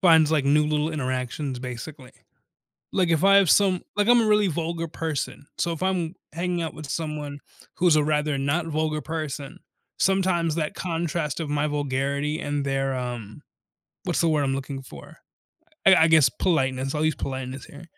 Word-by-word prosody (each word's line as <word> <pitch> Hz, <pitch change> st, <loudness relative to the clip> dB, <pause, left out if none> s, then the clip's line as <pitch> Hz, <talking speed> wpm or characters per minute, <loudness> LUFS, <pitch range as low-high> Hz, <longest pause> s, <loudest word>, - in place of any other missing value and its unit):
finds, 160 Hz, -4 st, +6 dB
like, 155 Hz, -4 st, +2 dB
new 150 Hz, +2 st, +4 dB
little 150 Hz, +1 st, 0 dB
interactions, 130 Hz, -1 st, -3 dB
basically. 125 Hz, +2 st, -8 dB, 0.8 s
Like, 185 Hz, -2 st, +2 dB
if 165 Hz, +1 st, +2 dB
I 195 Hz, 0 st, +7 dB
have 195 Hz, -3 st, +5 dB
some 190 Hz, -3 st, +4 dB, 0.2 s
like, 205 Hz, +1 st, +2 dB
I'm 240 Hz, -1 st, +7 dB
a 225 Hz, -, +1 dB
really 210 Hz, -1 st, +4 dB
vulgar 165 Hz, 0 st, -2 dB
person. 155 Hz, -3 st, -4 dB
So 170 Hz, -, 0 dB
if 165 Hz, -, -6 dB
I'm 180 Hz, -3 st, 0 dB, 0.2 s
hanging 175 Hz, +1 st, -2 dB
out 160 Hz, -, -4 dB
with 155 Hz, -2 st, -8 dB
someone 150 Hz, -3 st, -4 dB, 0.4 s
who's 175 Hz, -3 st, +4 dB
a 150 Hz, -, +3 dB
rather 150 Hz, -1 st, +1 dB
not 145 Hz, +5 st, 0 dB
vulgar 155 Hz, -1 st, -1 dB
person, 150 Hz, -4 st, -5 dB, 0.4 s
sometimes 185 Hz, -4 st, +2 dB
that 155 Hz, -2 st, -2 dB
contrast 165 Hz, -3 st, -2 dB
of 160 Hz, -, -3 dB
my 145 Hz, +1 st, 0 dB
vulgarity 145 Hz, +1 st, -1 dB
and 145 Hz, -1 st, -2 dB
their, 135 Hz, -1 st, 0 dB
um 120 Hz, -4 st, -5 dB, 0.7 s
what's -, -, 0 dB
the 165 Hz, -, +3 dB
word 150 Hz, -2 st, +2 dB
I'm 135 Hz, -1 st, 0 dB
looking 135 Hz, 0 st, -5 dB
for? -, -, -12 dB, 0.7 s
I 190 Hz, -, +9 dB
I 160 Hz, -, +5 dB
guess, 160 Hz, -4 st, +6 dB
politeness- 135 Hz, -3 st, 0 dB
I'll 150 Hz, +1 st, 0 dB
use 155 Hz, -1 st, +2 dB
politeness 130 Hz, -1 st, -5 dB
here- 145 Hz, +4 st, -12 dB
155 Hz, 175 wpm, -25 LUFS, 140-165 Hz, 0.8 s, I